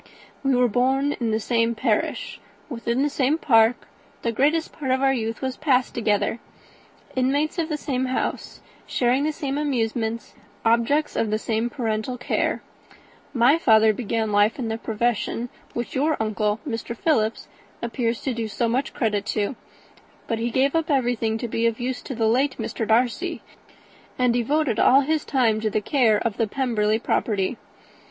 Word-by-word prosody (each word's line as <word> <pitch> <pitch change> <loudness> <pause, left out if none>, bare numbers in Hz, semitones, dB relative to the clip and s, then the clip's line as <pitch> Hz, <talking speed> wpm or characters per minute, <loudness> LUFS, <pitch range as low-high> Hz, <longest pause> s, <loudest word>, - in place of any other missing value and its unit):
"We 270 -1 +2
were 250 0 +4
born 265 +5 +1
in 235 -2 0
the 220 0 +1
same 230 +1 +1
parish, 220 -2 -1 0.3
within 235 0 -1
the - - +2
same 280 +2 +1
park; 230 -5 +3 0.4
the 235 - +1
greatest 300 +7 +1
part 285 -4 -5
of 260 +1 +1
our 270 0 +4
youth 225 0 -3
was 260 -1 -2
passed 260 -5 +1
together: 225 0 0 0.8
inmates 285 +6 +1
of 325 -1 -1
the 305 - -1
same 260 -3 -2
house, 255 0 -3 0.3
sharing 255 +3 +1
the 310 - +1
same 285 -1 -3
amusements, 230 -5 -2 0.3
objects 235 +7 +2
of 220 - 0
the 215 - +1
same 225 +1 -1
parental 230 -1 -2
care. 250 - -1 0.7
My 260 +5 +4
father 220 -5 +5
began 220 -1 -2
life 205 +2 +3
in 240 -4 -3
the 225 +1 -3
profession 235 +1 -1 0.3
which 240 0 -4
your 300 +4 +1
uncle, 215 -1 0
Mr. 230 -1 -4
Philips, 225 -9 0 0.4
appears 235 0 -1
to 265 - -2
do 230 -1 -3
so 230 +3 -1
much 250 +4 -1
credit 210 -4 0
to; 215 +3 -1 0.7
but 230 -2 -2
he 235 +1 -1
gave 270 +5 +1
up 325 -1 0
everything 240 -5 +1
to 240 - -4
be 230 +1 0
of 230 0 -2
use 245 0 -3
to 265 - -6
the 225 -1 0
late 260 +5 +2
Mr. 225 - -3
Darcy, 235 +2 +1 0.7
and 250 -2 +3
devoted 245 +1 +1
all 270 +2 +6
his 305 +2 0
time 230 -6 +1
to 220 - 0
the 215 - 0
care 225 -1 +3
of 215 -1 -2
the 225 - +1
Pemberley 220 -3 0
property. 215 -1 -1
240 Hz, 170 wpm, -24 LUFS, 225-265 Hz, 0.8 s, all